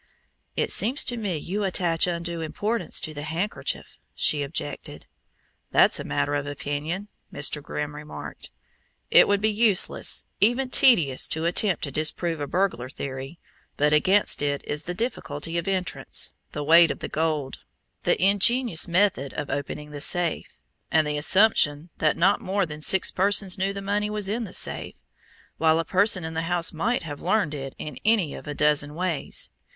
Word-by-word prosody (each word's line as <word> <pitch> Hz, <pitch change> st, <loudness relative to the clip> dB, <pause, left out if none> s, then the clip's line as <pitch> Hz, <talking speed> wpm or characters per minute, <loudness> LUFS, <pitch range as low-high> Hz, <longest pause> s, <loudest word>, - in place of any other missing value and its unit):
"It -, -, 0 dB
seems 255 Hz, +6 st, +2 dB
to 245 Hz, -, -2 dB
me 205 Hz, -7 st, -2 dB
you 195 Hz, +7 st, -3 dB
attach 175 Hz, -3 st, +2 dB
undue 170 Hz, -1 st, -3 dB
importance 205 Hz, +9 st, -1 dB
to 155 Hz, -, -4 dB
the 145 Hz, -, -7 dB
handkerchief," 170 Hz, +8 st, -4 dB, 0.2 s
she 150 Hz, -, +2 dB
objected. 145 Hz, +1 st, -5 dB, 0.6 s
"That's -, -, +4 dB
a -, -, -4 dB
matter 145 Hz, -, -1 dB
of 145 Hz, 0 st, -2 dB
opinion," 145 Hz, +7 st, -4 dB, 0.2 s
Mr. 150 Hz, +1 st, +1 dB
Grimm 145 Hz, +1 st, -5 dB
remarked. 150 Hz, 0 st, -9 dB, 0.6 s
"It -, -, +7 dB
would 205 Hz, 0 st, +1 dB
be 215 Hz, +1 st, +2 dB
useless, 210 Hz, -3 st, +2 dB
even 250 Hz, +4 st, +3 dB
tedious, 165 Hz, -, +4 dB
to 160 Hz, +1 st, -2 dB
attempt 180 Hz, +2 st, +1 dB
to 140 Hz, -, -2 dB
disprove 155 Hz, +2 st, -2 dB
a 145 Hz, -, -3 dB
burglar 175 Hz, -8 st, -1 dB
theory, 135 Hz, +3 st, -7 dB, 0.4 s
but 150 Hz, +1 st, +2 dB
against 190 Hz, +6 st, +3 dB
it 145 Hz, -1 st, -1 dB
is 150 Hz, +1 st, -4 dB
the 180 Hz, -, -4 dB
difficulty 165 Hz, -, -4 dB
of 170 Hz, -, -7 dB
entrance, 185 Hz, -2 st, -2 dB, 0.2 s
the 150 Hz, -, -4 dB
weight 165 Hz, +2 st, +7 dB
of -, -, -3 dB
the -, -, -6 dB
gold, 155 Hz, -4 st, -2 dB, 0.4 s
the -, -, +1 dB
ingenious 200 Hz, +1 st, +2 dB
method 175 Hz, -6 st, +1 dB
of 145 Hz, -2 st, -4 dB
opening 145 Hz, +1 st, -5 dB
the 145 Hz, -1 st, -7 dB
safe, 175 Hz, +1 st, 0 dB, 0.3 s
and 160 Hz, -1 st, +3 dB
the 150 Hz, 0 st, -2 dB
assumption 165 Hz, -3 st, +3 dB
that 155 Hz, -1 st, +2 dB
not 190 Hz, +4 st, +3 dB
more 195 Hz, +1 st, 0 dB
than 150 Hz, -1 st, -9 dB
six 190 Hz, +4 st, +3 dB
persons 195 Hz, 0 st, +2 dB
knew 190 Hz, +1 st, -1 dB
the 200 Hz, 0 st, -6 dB
money 205 Hz, +1 st, -1 dB
was 210 Hz, -2 st, -1 dB
in 225 Hz, +3 st, -2 dB
the 190 Hz, -, -10 dB
safe; -, -, -3 dB, 0.6 s
while 160 Hz, 0 st, +4 dB
a 165 Hz, -, -1 dB
person 190 Hz, -1 st, +2 dB
in 160 Hz, 0 st, -5 dB
the 160 Hz, -, -2 dB
house 175 Hz, -1 st, +2 dB
might 220 Hz, +10 st, -1 dB
have 145 Hz, -3 st, -7 dB
learned 185 Hz, -4 st, +1 dB
it 135 Hz, -2 st, -6 dB
in 150 Hz, -4 st, -7 dB
any 210 Hz, -8 st, +2 dB
of -, -, -10 dB
a 145 Hz, -, -4 dB
dozen 150 Hz, 0 st, +2 dB
ways. 175 Hz, -3 st, -2 dB
170 Hz, 175 wpm, -25 LUFS, 150-200 Hz, 0.6 s, It